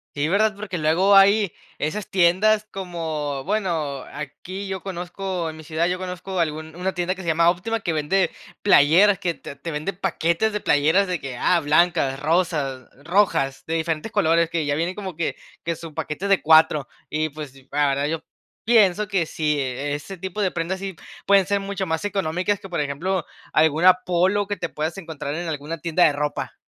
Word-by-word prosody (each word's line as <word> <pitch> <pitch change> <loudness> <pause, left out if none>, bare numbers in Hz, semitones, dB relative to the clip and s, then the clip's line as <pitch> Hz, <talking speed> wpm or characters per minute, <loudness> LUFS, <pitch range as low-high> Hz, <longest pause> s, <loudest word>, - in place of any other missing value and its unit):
Sí, 145 +1 0
¿verdad? 215 +3 +2
Porque 195 -4 -5
luego 175 +6 +4
hay 200 0 +5 0.2
esas 180 +7 -3
tiendas 195 +4 +3
como, 160 -7 -4
bueno, 165 -9 -1
aquí 180 +7 -7
yo 190 -1 -4
conozco, 180 -1 -4
en 160 - -9
mi 160 - -10
ciudad 160 +2 -1
yo 180 +1 -1
conozco 185 0 -5
algún 160 -1 -2
una 185 +2 -2
tienda 180 +1 0
que 190 - -9
se 175 - -8
llama 165 +1 +4
Óptima, 225 +6 -3
que 170 - -1
vende 160 +4 +1 0.3
playeras, 195 +2 +5
que 170 -2 -1
te - - -10
te 140 +4 -7
vende 155 +6 -3
paquetes 175 +2 0
de 210 - -1
playeras 160 +5 +3
de 180 -2 -2
que, 135 -3 -6
ah, 175 +7 +3
blancas, 155 -3 +2
rosas, 150 -5 0
rojas, 165 -6 +1
de 165 - -1
diferentes 165 +4 -2
colores, 170 -4 +3
que 165 -2 -1
ya 145 - 0
vienen 170 +4 -1
como 190 -4 -6
que 165 0 -2 0.3
que 170 0 -2
su 165 -1 -10
paquete 150 +6 -4
de 195 -2 +3
4 155 -3 +5 0.2
y, 155 +1 0
pues, 150 -2 -8 0.2
la 145 +1 +2
verdad, 140 +1 0
yo 160 +1 -3 0.4
pienso 210 -3 +4
que 195 -5 0
si 150 -2 -1
ese 145 +7 -4
tipo 190 +3 -4
de 190 - +2
prendas, 175 +3 -3
sí 195 -1 -5 0.3
pueden 200 -1 +5
ser 200 +2 +1
mucho 195 -1 -3
más 160 0 -2
económicas 195 0 -1
que, 195 - -11
por 175 - -2
ejemplo, 165 +6 -2 0.3
alguna 160 +4 +5
Polo 185 +3 +1
que 205 0 -3
te - - -3
puedas 155 +4 -3
encontrar 160 -5 -5
en 170 +1 -4
alguna 155 +1 -4
tienda 170 +2 +2
de 150 - +3
ropa. 145 0 -3
170 Hz, 190 wpm, -23 LUFS, 155-190 Hz, 0.4 s, hay